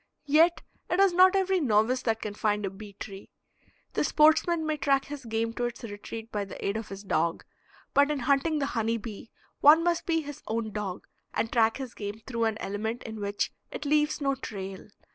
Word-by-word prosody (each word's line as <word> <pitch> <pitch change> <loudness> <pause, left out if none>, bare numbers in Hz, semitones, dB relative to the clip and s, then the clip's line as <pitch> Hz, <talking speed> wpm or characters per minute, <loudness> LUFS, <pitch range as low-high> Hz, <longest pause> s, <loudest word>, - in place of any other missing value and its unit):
Yet 320 +4 +4 0.3
it 355 - +1
is 390 -2 +5
not 370 +2 +6
every 385 -1 +2
novice 240 -2 +2
that 225 -2 -1
can 210 - -4
find 210 -1 0
a 190 - -3
bee 200 +1 -11
tree. 195 0 -9 0.6
The - - +1
sportsman 315 +2 +4
may 310 0 0
track 275 -1 +2
his 285 -2 -8
game 225 0 -1
to 245 - -2
its 240 0 -5
retreat 225 +1 -7
by 205 -1 -1
the 195 - -7
aid 200 - 0
of 220 -1 -4
his 195 +1 -8
dog, 170 -4 0 0.5
but 285 +1 +5
in 295 -3 -1
hunting 280 +5 +2
the 285 - 0
honey 230 0 0
bee 220 0 -8 0.3
one 310 +3 +7
must 345 -1 0
be 325 -1 +2
his 290 -2 -8
own 220 -1 -2
dog, 200 -3 -4 0.3
and 225 - 0
track 225 -2 +3
his 265 -3 -6
game 210 +1 -6
through 230 -3 -1
an 220 -1 0
element 220 +4 -3
in 220 -1 -7
which 205 0 -2 0.2
it 295 - -6
leaves 300 +1 +2
no 275 -2 +1
trail. 195 -7 -7
230 Hz, 205 wpm, -28 LUFS, 210-295 Hz, 0.6 s, one